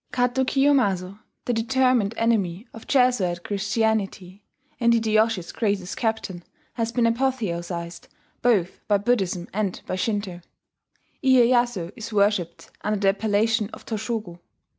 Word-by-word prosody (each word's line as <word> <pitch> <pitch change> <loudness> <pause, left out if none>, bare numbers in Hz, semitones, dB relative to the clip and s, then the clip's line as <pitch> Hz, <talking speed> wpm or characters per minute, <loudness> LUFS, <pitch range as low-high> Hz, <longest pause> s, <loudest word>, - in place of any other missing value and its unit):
Kato 250 +1 +1
Kiyomasa, 240 -9 +1 0.3
the 245 - 0
determined 235 -2 +2
enemy 215 -3 0
of 225 - -12
Jesuit 230 -10 +2
Christianity, 205 -2 -1 0.4
and 235 -1 +4
Hideyoshi's 220 -4 +1
greatest 200 -4 -2
captain, 220 -6 -2 0.3
has 230 -1 -2
been 235 0 +1
apotheosized 185 -9 -2 0.3
both 210 -8 +1
by 205 - +4
Buddhism 195 -5 0
and 200 -2 -1
by - - -3
Shinto. 200 -3 -2 0.8
Iyeyasu 240 -7 +3
is 230 -1 -7
worshipped 200 -4 0
under 210 0 0
the 195 -1 +3
appellation 210 +1 +1
of - - -11
Toshogu. 215 -5 -4
215 Hz, 120 wpm, -24 LUFS, 190-235 Hz, 0.8 s, and